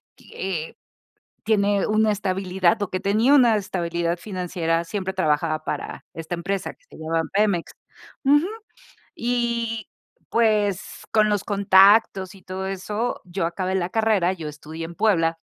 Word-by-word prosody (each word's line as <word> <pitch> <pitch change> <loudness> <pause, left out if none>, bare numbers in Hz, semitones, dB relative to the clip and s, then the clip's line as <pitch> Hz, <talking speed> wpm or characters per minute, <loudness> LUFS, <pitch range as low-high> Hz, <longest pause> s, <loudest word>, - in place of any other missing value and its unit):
y, - - -18
eh, 170 -5 -4 0.7
tiene 205 -2 +2
una 215 0 +3
estabilidad 190 -1 0
o 205 - -1
que 185 - -2
tenía 215 +7 +3
una 240 -5 +5
estabilidad 170 -3 -2
financiera, 170 -3 -2
siempre 190 +2 -4
trabajaba 155 -3 0
para - - -5
esta 165 +1 -5
empresa 190 +3 -3
que - - -33
se - - -14
llaman 160 0 -2
Pemex. 200 -4 +1 0.5
Ujú 295 +4 +4 0.7
y 235 -2 -1 0.4
pues 210 -4 +1
con 215 -1 +4
los 205 -2 0
contactos 195 -1 +4
y 195 - -16
todo 190 +1 -5
eso, 210 +5 -3
yo 180 0 -2
acabé 185 +2 -2
la 180 -2 0
carrera, 215 -4 +2
yo 165 -4 -7
estudié 155 +2 -7
en 170 +1 -9
Puebla, 165 -6 +2
190 Hz, 145 wpm, -23 LUFS, 170-215 Hz, 0.7 s, una